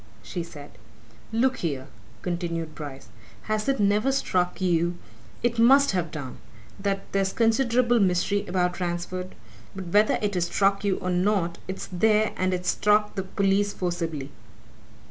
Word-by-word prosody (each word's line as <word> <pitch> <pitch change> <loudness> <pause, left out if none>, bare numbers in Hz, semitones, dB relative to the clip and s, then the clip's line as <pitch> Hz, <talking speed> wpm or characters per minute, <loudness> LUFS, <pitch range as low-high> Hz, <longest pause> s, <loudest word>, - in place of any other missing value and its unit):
she 175 - -4
said. 145 -4 -10 0.6
"Look 255 +3 +2
here!" 140 -6 -3 0.4
continued 170 -2 -3
Bryce. 145 -3 -8 0.3
"Has 215 +3 -1
it 275 - +1
never 210 +5 +3
struck 180 -9 0
you 175 -1 +1 0.5
it 235 -1 +1
must 275 +4 +6
have 180 -3 -1
done! 145 -4 -7 0.4
that 195 0 -1
there's 195 -1 +1
considerable 235 +1 +3
mystery 195 +1 +1
about 180 0 0
Ransford? 180 +1 -3 0.4
But 190 -2 -6
whether 210 +4 +4
it 205 -1 -1
has 180 -2 +1
struck 195 +2 +1
you 200 -2 +1
or 180 - -3
not, 180 -2 +1
it's 190 0 -5
there, 215 +4 +3
and 185 0 0
it's 180 0 0
struck 210 0 +2
the 195 - -2
police 195 +1 +1
forcibly. 165 -6 -3
190 Hz, 145 wpm, -26 LUFS, 175-210 Hz, 0.6 s, must